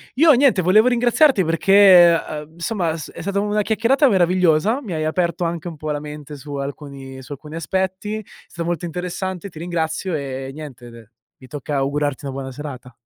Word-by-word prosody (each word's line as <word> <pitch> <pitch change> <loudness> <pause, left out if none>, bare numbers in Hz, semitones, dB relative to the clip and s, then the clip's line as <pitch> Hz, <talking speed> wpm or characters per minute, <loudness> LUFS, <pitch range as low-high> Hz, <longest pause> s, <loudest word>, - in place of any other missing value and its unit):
Io, 315 +4 +6
niente, 255 -8 +4
volevo 210 +7 +5
ringraziarti 245 -1 +3
perché, 175 0 +6
uhm, 155 +1 -8
somma, 170 -2 -1
è - - -5
s 155 - -8
è - - -9
stata 200 +3 -1
una 210 +1 0
chiacchierata 230 +7 +2
meravigliosa, 185 - +2
mi 210 -10 -6
hai 155 -1 -2
aperto 170 +2 -1
anche 170 0 -3
un 170 - -6
po' 155 +1 -4
la 145 - -2
mente 150 0 -9
su 145 +1 -8
alcuni 140 -1 -7
su 130 - -14
alcuni 150 +2 -11
aspetti. 190 +5 -2
È 215 - -7 0.2
stato 170 -1 -6
molto 175 0 -2
interessante, 180 +2 -5
ti 165 - -12
ringrazio 170 +1 -2
e 135 -2 -5
niente 135 -5 -10
de 115 -2 -14 0.3
mi 130 - -14
tocca 145 +1 -5
augurarti 140 +1 -1
una 135 - -4
buona 135 0 -6
serata. 130 -2 -8
165 Hz, 195 wpm, -20 LUFS, 145-195 Hz, 0.3 s, Io